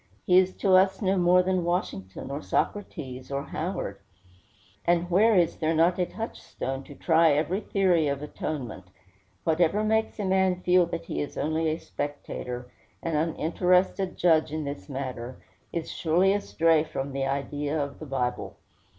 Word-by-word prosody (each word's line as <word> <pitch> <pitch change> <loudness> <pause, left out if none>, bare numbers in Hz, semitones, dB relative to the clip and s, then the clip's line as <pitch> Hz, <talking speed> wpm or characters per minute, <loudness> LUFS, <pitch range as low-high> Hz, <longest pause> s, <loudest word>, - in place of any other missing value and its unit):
He 180 0 +6
is 185 0 +1
to 195 - +2
us 190 +1 +4
no 195 -2 +1
more 180 0 +4
than 185 -1 0
Washington, 135 - -3
or 140 +2 -4
Socrates, 135 -13 -3
or 140 0 -2
Howard. 155 - -4 0.8
And 175 +1 +1
where 215 +5 +5
is 175 -3 +3
there 160 0 0
not 170 +3 +3
a 180 - +1
touchstone 135 - -5
to 145 - -11
try 165 -1 +4
every 160 +6 0
theory 185 -6 +2
of 140 0 -2
atonement? 130 -9 -5 0.6
Whatever 170 +5 +2
makes 220 +1 +1
a 205 - -2
man 190 -1 +2
feel 180 -1 +4
that 170 0 -5
he - - -3
is 145 - -5
only 160 +1 0
a 155 - -1
spectator, 125 -5 -6 0.3
an 165 -2 -1
uninterested 180 +4 +1
judge 160 -3 +3
in 155 0 -3
this 145 +1 -6
matter, 130 -2 -5 0.3
is 165 -1 -4
surely 180 +4 +2
astray 165 -6 +2
from 140 -3 -4
the 135 0 -1
idea 145 +2 -2
of 140 -1 -4
the 155 - -8
Bible. 125 -2 -2
165 Hz, 160 wpm, -27 LUFS, 140-180 Hz, 0.8 s, He